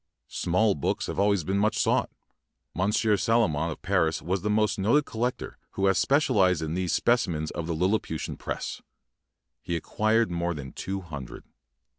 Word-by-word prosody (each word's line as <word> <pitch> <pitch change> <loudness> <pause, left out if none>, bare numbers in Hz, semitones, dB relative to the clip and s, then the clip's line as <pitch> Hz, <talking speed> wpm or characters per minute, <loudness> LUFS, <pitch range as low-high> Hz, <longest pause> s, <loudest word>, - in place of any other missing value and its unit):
Small 100 +4 +1
books 70 - -1
have - - -4
always 100 -3 +2
been 95 +4 0
much 105 +2 +1
sought. - - +2 0.6
Monsieur 105 +4 +2
Salomon 85 -8 +1
of 80 - -7
Paris 90 -4 +1
was 90 +3 -2
the 105 - -1
most 105 -1 +1
noted 120 +10 +3
collector 120 +2 -3
who 95 - 0
has 95 -1 +3
specialized 95 - +3
in 80 0 -3
these 90 0 -1
specimens 90 -11 +1
of 80 - -5
the 85 - -1
Lilliputian 90 -2 -1
press. - - -5 0.8
He 85 - -3
acquired 110 +6 +1
more 85 0 -1
than 70 -3 -7
two 95 +1 -4
hundred. 70 -8 -8
95 Hz, 160 wpm, -27 LUFS, 85-110 Hz, 0.8 s, noted